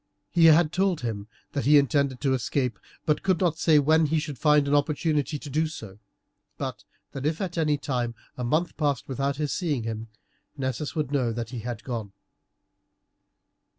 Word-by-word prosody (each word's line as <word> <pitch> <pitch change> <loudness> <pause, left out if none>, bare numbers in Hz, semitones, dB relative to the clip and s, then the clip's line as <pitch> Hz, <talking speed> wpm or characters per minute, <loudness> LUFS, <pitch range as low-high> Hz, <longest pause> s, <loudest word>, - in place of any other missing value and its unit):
He 170 -2 +5
had 160 0 +6
told 185 -2 +1
him 110 -4 -4 0.2
that 140 - -2
he 150 +2 +7
intended 140 -2 +2
to 135 -2 +2
escape, 125 -1 -1 0.3
but 150 - +1
could 185 -3 +1
not 165 -3 +1
say 160 -2 +5
when 155 +2 +4
he 160 +2 +1
should 150 -4 -4
find 150 -2 +4
an 140 - +1
opportunity 150 0 +1
to 145 - -10
do 155 +3 0
so; 110 -10 -9 0.6
but - - -5 0.3
that 135 - -6
if 155 +2 0
at 185 -3 -3
any 155 -3 +2
time 125 -4 -2 0.2
a 125 - -5
month 155 +8 0
passed 145 -4 0
without 135 +1 -1
his 150 0 -2
seeing 150 -9 -1
him, 115 0 -4 0.5
Nessus 130 +3 -3
would 150 -3 -1
know 130 -5 +1
that 115 0 -5
he 125 - -5
had 115 0 -5
gone. 115 -6 -5
145 Hz, 185 wpm, -26 LUFS, 125-155 Hz, 0.6 s, he